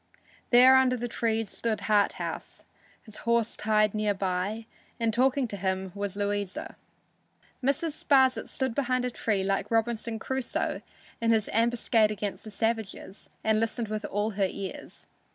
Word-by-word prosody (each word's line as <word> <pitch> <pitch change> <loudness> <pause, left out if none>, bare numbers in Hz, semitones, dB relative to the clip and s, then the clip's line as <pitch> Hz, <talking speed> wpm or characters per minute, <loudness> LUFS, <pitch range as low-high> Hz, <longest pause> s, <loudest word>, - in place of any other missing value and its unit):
There 255 +2 +8
under 255 -1 +3
the 240 +1 -3
trees 225 -2 -1
stood 225 -2 -2
Harthouse, 205 -2 -1 0.4
his 215 -2 -11
horse 235 -1 +1
tied 215 -1 +2
near 210 -1 0
by, 195 +4 -2 0.3
and 230 -1 +1
talking 265 +4 +2
with 210 -5 -4
him 190 -1 -1
was 200 -1 -4
Louisa. 205 -1 -3 0.9
Mrs. 285 +4 -1
Sparsit 265 -3 +4
stood 260 -3 -2
behind 255 -1 0
a 250 - -2
tree, 210 -4 -1
like 195 +1 -1
Robinson 225 0 0
Crusoe 265 +3 -2 0.4
in 230 - +1
his 220 -2 +2
ambuscade 230 -1 +3
against 210 -1 -4
the 220 - -8
savages, 220 -2 -3
and 220 0 +3
listened 225 0 -1
with 215 0 -3
all 205 +2 -1
her 195 -1 +1
ears. 195 0 -8
220 Hz, 150 wpm, -28 LUFS, 205-240 Hz, 0.9 s, There